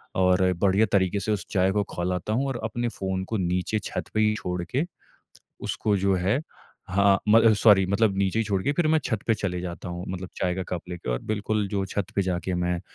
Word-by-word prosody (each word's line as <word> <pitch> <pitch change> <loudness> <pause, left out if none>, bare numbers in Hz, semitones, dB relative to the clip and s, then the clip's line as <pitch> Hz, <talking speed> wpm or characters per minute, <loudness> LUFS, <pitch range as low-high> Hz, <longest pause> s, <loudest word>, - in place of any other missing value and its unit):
और 90 0 +3 0.2
बढ़िया 100 +2 +4
तरीक़े 95 0 +2
से 105 +2 -2
उस 105 - -1
चाय 95 -1 +3
को 105 +1 +1
खौलाता 90 +3 -2
हूँ 135 +5 0
और 130 -3 -3
अपने 120 +2 -2
फ़ोन 95 -3 -3
को 110 +2 -2
नीचे 90 +4 0
छत - - -4
पे 110 - +1
ही 105 0 +3
छोड़ 90 -4 -3
के, 130 - -1 0.8
उसको 105 -2 0
जो 100 0 +2
है 95 +6 +1 0.5
हाँ, 100 0 +4
मतलब 115 +1 +6
सॉरी 100 -2 +5
मतलब 100 +1 +2
नीचे 100 +2 +1
ही 115 - +2
छोड़ 100 -3 -1
के 145 - +1
फिर 170 +2 +1
मैं 160 0 +4
छत 110 -4 -1
पे 115 - +3
चले 90 -4 -3
जाता 90 0 -6
हूँ 90 +1 -5
मतलब 95 0 -5
चाय 90 -1 0
का 95 - -3
कप 90 - -3
लेके 85 -8 -5
और - - -1
बिल्कुल 105 0 -1
जो 100 -1 -1
छत 100 0 -2
पे 100 - +3
जाके 90 -1 -2
मैं 90 0 -1
95 Hz, 225 wpm, -26 LUFS, 90-110 Hz, 0.8 s, मतलब